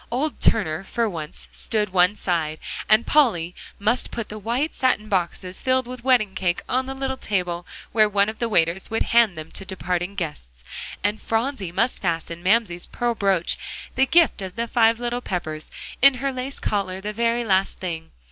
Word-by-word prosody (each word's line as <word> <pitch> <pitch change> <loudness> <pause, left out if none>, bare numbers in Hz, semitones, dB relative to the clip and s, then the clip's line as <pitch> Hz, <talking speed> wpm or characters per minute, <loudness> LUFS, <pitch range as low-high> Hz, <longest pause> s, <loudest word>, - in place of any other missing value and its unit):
Old 275 +6 -1
Turner 175 -5 +2
for 230 +3 -1
once 160 -6 -6
stood 210 -3 -1
one 180 +2 +4
side. 165 -6 -1 0.3
And 215 +2 +6
Polly 190 - +3 0.2
must 220 +5 +1
put 230 -2 -5
the 215 - -6
white 240 +9 -1
satin 250 -5 +1
boxes 185 -1 -2
filled 260 -1 +2
with 250 -1 -8
wedding 245 -7 +3
cake 180 -2 -1
on 260 +1 0
the 270 - -4
little 265 0 -2
table 180 -6 -2 0.2
where 215 -2 +4
one 200 0 +3
of 220 0 -5
the 235 - 0
waiters 170 -1 +1
would 225 0 0
hand 230 -7 +5
them 155 0 -7
to - - -7
departing 180 0 -3
guests. 60 - -6 0.4
And 205 +2 0
Phronsie 225 -5 -1
must 235 +8 0
fasten 170 -1 -2
Mamsie's 185 -2 +3
pearl 240 -1 -1
broach 195 -5 +1 0.3
the 265 +1 +3
gift 335 -9 +4
of 185 -1 -6
the 235 0 -2
five 230 -1 +3
little 240 0 -2
Peppers 155 -7 -4 0.3
in 275 0 +8
her 270 +2 -2
lace 255 +2 -5
collar 190 -3 -1
the 210 +2 -4
very 235 +2 +1
last 190 -2 +2
thing. 165 -3 -5
210 Hz, 185 wpm, -23 LUFS, 180-240 Hz, 0.4 s, in